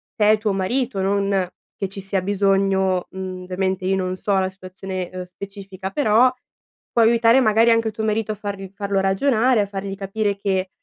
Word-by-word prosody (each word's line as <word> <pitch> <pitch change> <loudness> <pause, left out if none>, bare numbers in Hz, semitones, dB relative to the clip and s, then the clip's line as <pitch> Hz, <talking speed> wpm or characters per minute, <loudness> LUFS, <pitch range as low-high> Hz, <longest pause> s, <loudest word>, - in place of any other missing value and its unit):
te 210 -1 +4
e 215 - +4
tuo 215 -1 0
marito, 225 +3 -1
non 195 -1 +1 0.3
che 195 - -3
ci 195 +1 -7
sia 195 0 -1
bisogno 195 -1 +1
mhmm, 185 -1 -6
ovviamente, 185 0 -2
io 190 +1 +2
non 185 -1 -2
so 200 +2 -1
la 190 0 0
situazione, 185 -1 -6
uhm, 185 0 -5
specifica, 195 0 -8
però, 250 -1 +4 0.6
può 235 - +4
aiutare 230 +2 +5
magari 225 0 +4
anche 230 -1 +2
tuo 220 +1 -5
marito 215 0 0
a - - -9
farl 200 -2 -6
farlo 200 -1 -1
ragionare, 230 +5 +2
a 200 - -1
fargli 195 0 -5
capire 200 +1 -2
che 190 -1 -1
195 Hz, 185 wpm, -22 LUFS, 190-215 Hz, 0.6 s, aiutare